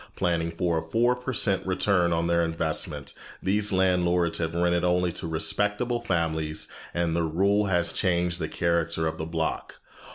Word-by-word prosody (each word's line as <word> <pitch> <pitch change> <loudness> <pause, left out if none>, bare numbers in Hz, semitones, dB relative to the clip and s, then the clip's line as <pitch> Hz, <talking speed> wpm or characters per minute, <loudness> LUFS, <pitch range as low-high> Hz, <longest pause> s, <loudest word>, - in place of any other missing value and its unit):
Planning 85 -1 0
for 85 -1 0
a - - -10
four 120 +2 +3
per 125 +1 -5
cent 100 -5 +1
return 95 -1 +2
on 85 0 +1
their 85 0 +2
investment, 80 -1 -2 0.3
these 105 +2 +1
landlords 90 -2 +2
have 80 0 -2
rented 85 0 +1
only 90 0 +2
to 85 - -4
respectable 105 +9 0
families, 80 -6 -1 0.2
and 85 -1 -1
their 85 - +1
rule 100 +6 +2
has 85 -3 +1
changed 90 -2 0
the 80 - -2
character 85 0 0
of 80 0 -3
the 80 - -3
block. 80 -1 -3
85 Hz, 165 wpm, -26 LUFS, 80-95 Hz, 0.3 s, four